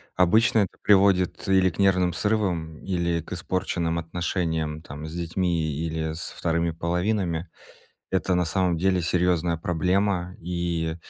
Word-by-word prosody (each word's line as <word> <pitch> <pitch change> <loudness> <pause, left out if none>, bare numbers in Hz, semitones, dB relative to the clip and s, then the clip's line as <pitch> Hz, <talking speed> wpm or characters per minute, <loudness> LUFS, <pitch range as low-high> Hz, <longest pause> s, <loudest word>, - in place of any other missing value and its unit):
обычно 110 +5 +4
это 100 - -1
приводит 95 -2 +3
или 95 -1 +4
к 90 - -12
нервным 90 -2 +3
срывам, 90 -6 -1
или 85 -3 -1
к 80 - -8
испорченным 85 -1 -1
отношениям 80 -2 -2
там 75 -1 -8
с 80 - -8
детьми, 85 -1 -1
или 80 +1 -2
со 80 - -7
вторыми 85 0 0
половинами. 85 0 -1 0.6
Это 95 -1 +1
на 90 -1 +2
самом 90 0 +1
деле 95 +1 +2
серьезная 85 -1 +1
проблема. 90 +2 0
И 85 -2 -2
85 Hz, 135 wpm, -25 LUFS, 80-95 Hz, 0.6 s, обычно